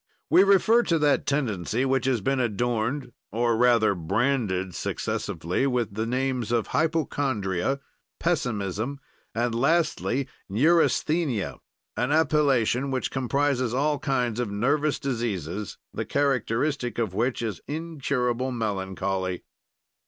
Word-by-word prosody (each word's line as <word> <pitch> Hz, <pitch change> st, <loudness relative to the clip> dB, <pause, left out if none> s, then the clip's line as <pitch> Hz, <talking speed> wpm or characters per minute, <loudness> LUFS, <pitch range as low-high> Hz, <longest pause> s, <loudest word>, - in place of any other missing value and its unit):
We -, -, +7 dB
refer 200 Hz, +4 st, +5 dB
to 170 Hz, -8 st, +1 dB
that 150 Hz, -2 st, +2 dB
tendency 120 Hz, -4 st, 0 dB
which 130 Hz, -1 st, +1 dB
has 125 Hz, -5 st, +1 dB
been 135 Hz, +6 st, 0 dB
adorned 120 Hz, +3 st, -1 dB, 0.2 s
or 115 Hz, +2 st, +1 dB
rather 115 Hz, -3 st, +4 dB
branded 95 Hz, 0 st, 0 dB
successively 90 Hz, +11 st, -2 dB
with 120 Hz, -5 st, -1 dB
the 110 Hz, +2 st, -2 dB
names 125 Hz, -2 st, -1 dB
of 115 Hz, -4 st, +2 dB
hypochondria, 135 Hz, -, 0 dB, 0.4 s
pessimism, 125 Hz, -, -1 dB, 0.4 s
and 120 Hz, +1 st, 0 dB
lastly 140 Hz, -1 st, +1 dB, 0.2 s
neurasthenia, 150 Hz, -, +2 dB, 0.4 s
an 125 Hz, +3 st, 0 dB
appellation 140 Hz, -5 st, +2 dB
which 130 Hz, -1 st, -2 dB
comprises 130 Hz, -2 st, 0 dB
all 145 Hz, +2 st, +1 dB
kinds 125 Hz, -5 st, 0 dB
of 120 Hz, -4 st, -1 dB
nervous 140 Hz, +9 st, +1 dB
diseases, 105 Hz, -, -3 dB, 0.2 s
the -, -, -2 dB
characteristic 135 Hz, -1 st, 0 dB
of 110 Hz, -6 st, -1 dB
which 120 Hz, +4 st, 0 dB
is 110 Hz, -5 st, -3 dB
incurable 135 Hz, -5 st, -1 dB
melancholy. 95 Hz, -4 st, -2 dB
125 Hz, 115 wpm, -26 LUFS, 110-140 Hz, 0.4 s, We